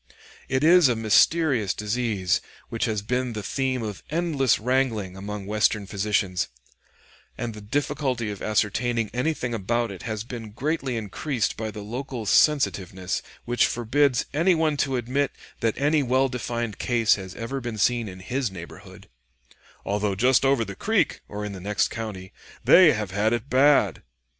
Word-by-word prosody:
It 130 +1 +1
is 170 -2 +6
a 120 - +1
mysterious 115 - +3
disease 105 -4 0 0.3
which 115 - -1
has 110 -3 -2
been 125 +2 -1
the 105 -1 -5
theme 130 +2 -1
of 105 -3 -5
endless 150 -7 +1
wrangling 115 -6 0
among 100 +1 -6
Western 105 0 +1
physicians, 100 -2 0 0.9
and 120 -2 -4
the 105 - -10
difficulty 130 -1 -1
of 100 - -8
ascertaining 110 +1 0
anything 125 -1 -1
about 115 +2 -1
it 95 - -9
has 110 -2 -4
been 115 -3 -8
greatly 135 -1 -2
increased 115 +3 -2
by 110 0 -4
the 105 -1 -7
local 120 +1 -5
sensitiveness 95 - +2 0.2
which 120 0 +3
forbids 125 +3 +1
any 170 +5 +3
one 160 -2 +1
to 135 -1 0
admit 130 +4 -1 0.3
that 115 -2 0
any 145 +2 +3
well 130 +1 +2
defined 120 -3 -4
case 115 -3 +3
has 95 -2 -5
ever 130 +4 -4
been 120 -2 -5
seen 120 +1 +1
in 95 0 -10
his 125 +5 -2
neighborhood, 85 -3 -11 0.8
"although 100 -1 0
just 125 +7 +3
over 135 -4 +3
the 100 - -7
creek - - 0
(or 105 0 -5
in 105 - -4
the 95 - -7
next 105 +3 0
county) 100 -5 -6 0.3
they 175 -4 +7
have 105 -3 -3
had 105 +4 +1
it 120 +3 -3
bad." 140 +3 +4
115 Hz, 160 wpm, -25 LUFS, 105-130 Hz, 0.9 s, they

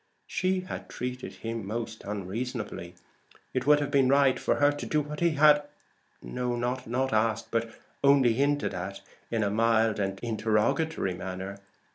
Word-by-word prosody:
She 185 0 0
had 185 - -7
treated 125 +1 -5
him 115 -1 -5
most 110 +1 -4
unreasonably. 105 -2 -4 0.6
It 130 +1 -1
would 150 0 +7
have 145 -1 -2
been 135 -3 +4
right 140 -1 +4
for - - +1
her 145 0 +4
to 145 - -5
do 155 - +2
what 150 0 -4
he 170 -2 +3
had 150 0 +7 0.6
not 125 - -2
asked, 110 0 +1
but 115 0 0 0.3
only 140 -4 +5
hinted 145 +4 +1
at 95 +2 -5 0.3
in 115 -2 0
a 100 - 0
mild 110 0 +2
and 95 -1 -2
interrogatory 110 - 0
manner. 95 +2 -6
120 Hz, 150 wpm, -28 LUFS, 105-140 Hz, 0.6 s, would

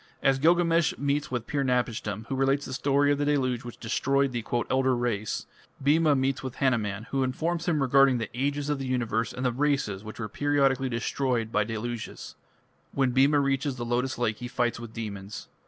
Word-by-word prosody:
As 135 -1 +3
Gilgamesh 170 +1 +3
meets 145 +1 -1
with 125 -3 -3
Pir 140 -2 -1
napishtim, 120 -4 -1
who 135 - -4
relates 135 +2 +1
the 130 - -6
story 140 +2 +2
of 145 - +1
the 145 - +1
Deluge 130 -5 0
which 120 -1 -9
destroyed 135 +4 +1
the 120 -2 -3 0.2
"elder 130 -1 +2
race", 110 -4 -2 0.3
Bhima 150 +2 +3
meets 135 0 0
with 130 -2 -6
Hanuman, 110 -6 0
who 135 - +1
informs 160 +7 -1
him 155 -5 +2
regarding 135 0 +5
the 115 -2 -3
Ages 140 +3 -1
of 145 - -1
the 135 - -4
Universe 115 -3 0
and 125 - -4
the 125 - +3
races 130 -7 0
which 110 0 -9
were 110 - -3
periodically 135 +1 +1
destroyed 120 -1 -1
by 105 - +2
deluges. 115 +1 -5 0.6
When 135 -2 +2
Bhima 140 +3 +4
reaches 140 0 0
the 120 -1 -5
lotus 125 +2 -1
lake 115 -3 0
he 120 - -6
fights 120 -1 -1
with 115 -1 -8
demons. 100 -3 -7
130 Hz, 190 wpm, -27 LUFS, 120-140 Hz, 0.6 s, regarding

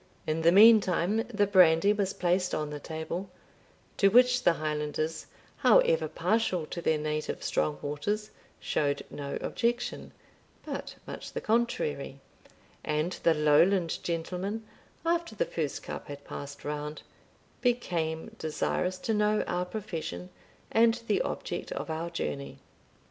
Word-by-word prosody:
In 155 +1 -1
the 165 +1 +5
meantime 205 -2 +6
the 205 -2 +2
brandy 185 0 +5
was 200 -2 0
placed 180 0 0
on 150 -1 -3
the 150 - -5
table, 160 +5 -5 0.7
to 200 - +5
which 250 +4 +5
the 175 - +4
Highlanders, 155 0 -3 0.3
however - - +4
partial 215 -7 0
to 170 - -4
their 160 -2 +2
native 150 0 -3
strong 150 -1 0
waters, 205 +9 -2 0.3
showed 140 -1 -1
no 140 -1 -4
objection, 240 +1 -2 0.5
but - - -5
much - - -8
the - - -2
contrary; 220 - -1 0.6
and 155 +3 0
the 165 - +4
Lowland 165 +4 +3
gentleman, 180 +6 -3 0.4
after 335 -7 0
the - - +1
first 155 -4 -3
cup - - -7
had 145 0 -8
passed 145 0 -8
round, 150 +1 -4 0.6
became 170 -10 -1
desirous 180 +3 -1
to 220 +4 -2
know 210 0 +2
our 180 0 -1
profession, 165 - -5 0.4
and 225 0 +5
the 450 - +1
object - - -4
of - - -4
our 165 +2 -3
journey. 140 -4 -4
175 Hz, 130 wpm, -29 LUFS, 155-215 Hz, 0.7 s, meantime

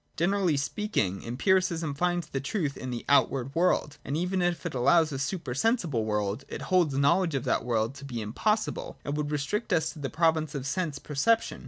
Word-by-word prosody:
Generally 180 -2 +2
speaking, 140 - -1
Empiricism 165 - +1
finds 175 +3 0
the 135 - -3
truth 145 -1 -2
in 130 - -6
the 120 -1 -5
outward 135 -1 +2
world; 165 -3 +1
and 145 - -2
even 180 +2 0
if 175 0 0
it 170 - -3
allow 140 +7 +5
a 150 -4 -4
super 140 -2 -3
sensible 155 - +1
world, 105 +2 -1
it - - -6
holds 170 -7 +2
knowledge 165 +3 +3
of 135 - -1
that - - 0
world 115 0 0
to 140 0 -11
be 125 -4 -5
impossible, 210 - -1
and 145 - -2
would 150 -1 -2
restrict 150 +10 -2
us 160 - +2
to - - -12
the 135 -2 -3
province 160 -1 +1
of 135 -2 -4
sense 155 0 -2
perception. 155 +12 +1
150 Hz, 195 wpm, -28 LUFS, 135-175 Hz, -, allow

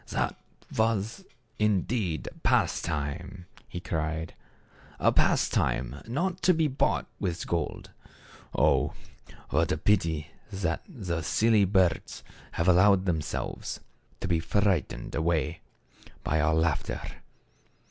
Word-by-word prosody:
" - - -32
That - - -1 0.4
was, 110 - 0 0.3
indeed, 105 - 0
pastime," 85 +6 0 0.2
he 90 - -6
cried; 80 -1 -3 0.4
" - - -25
a - - +4
pastime 65 +3 +1
not 175 +9 -1
to 185 - +5
be 160 -1 +3
bought 135 -1 +1
with 85 -2 -2
gold. 85 -3 -3 0.7
Oh! - - +3 0.6
what 80 +2 +2
a - - +1
pity 80 -4 +1 0.2
that 90 -4 -1
the 90 - -3
silly 110 +5 +3
birds 95 -2 +1 0.3
have 85 - 0
allowed 95 +1 +5
them 85 -4 +1
selves 75 - -4 0.4
to - - -2
be 85 -2 +2
frightened 90 -8 0
away 80 0 0 0.6
by 80 0 +1
our 75 +1 +3
laughter. 80 -2 0
90 Hz, 115 wpm, -28 LUFS, 80-105 Hz, 0.7 s, to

